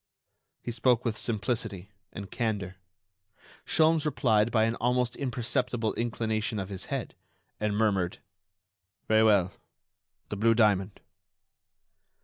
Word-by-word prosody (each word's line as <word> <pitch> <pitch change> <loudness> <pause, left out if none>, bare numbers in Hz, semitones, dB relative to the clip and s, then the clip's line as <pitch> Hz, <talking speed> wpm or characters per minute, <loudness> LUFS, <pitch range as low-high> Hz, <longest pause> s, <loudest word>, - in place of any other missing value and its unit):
He 120 - -3
spoke 125 0 +2
with 115 -2 0
simplicity 110 -4 -3 0.2
and 100 0 -8
candor. 100 -5 -2 0.9
Sholmes 160 -1 +3
replied 115 -7 +2
by 110 -2 +2
an 115 +1 +1
almost 125 0 0
imperceptible 125 -3 -1
inclination 110 -2 -2
of 95 -1 -4
his 95 -2 -5
head, - - -4 0.5
and 105 -1 -1
murmured: 100 -5 +1 0.9
"Very 110 0 +4
well, 100 -4 +3 0.8
the 105 - -4
blue 115 +2 +3
diamond." 105 -3 +2
110 Hz, 115 wpm, -28 LUFS, 105-120 Hz, 0.9 s, Very